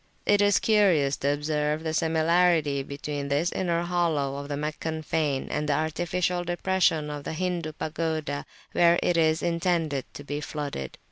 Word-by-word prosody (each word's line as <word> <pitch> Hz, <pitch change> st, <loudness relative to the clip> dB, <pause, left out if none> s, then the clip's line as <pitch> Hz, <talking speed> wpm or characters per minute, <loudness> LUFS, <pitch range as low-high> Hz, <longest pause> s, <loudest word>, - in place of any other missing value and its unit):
It 205 Hz, 0 st, +4 dB
is 205 Hz, -1 st, +4 dB
curious 180 Hz, -11 st, +3 dB
to 140 Hz, -, +1 dB
observe 150 Hz, +1 st, -1 dB
the 160 Hz, -1 st, -2 dB
similarity 160 Hz, -2 st, +2 dB
between 140 Hz, +1 st, -5 dB
this 145 Hz, +5 st, +1 dB
inner 170 Hz, -2 st, 0 dB
hollow 165 Hz, -6 st, 0 dB
of 140 Hz, 0 st, -6 dB
the 145 Hz, -1 st, -3 dB
Meccan 155 Hz, +1 st, -3 dB
fane 150 Hz, -3 st, -1 dB
and 150 Hz, 0 st, -1 dB
the -, -, +3 dB
artificial 175 Hz, +3 st, -1 dB
depression 175 Hz, -3 st, +1 dB
of 145 Hz, -1 st, -6 dB
the -, -, -4 dB
Hindu 170 Hz, -2 st, -2 dB
pagoda 155 Hz, -2 st, -3 dB, 0.2 s
where 170 Hz, 0 st, +4 dB
it 175 Hz, -, +2 dB
is 160 Hz, -1 st, +2 dB
intended 170 Hz, -5 st, 0 dB
to 145 Hz, -, -7 dB
be 145 Hz, +1 st, -4 dB
flooded. 145 Hz, -, -5 dB
155 Hz, 160 wpm, -26 LUFS, 145-175 Hz, 0.2 s, It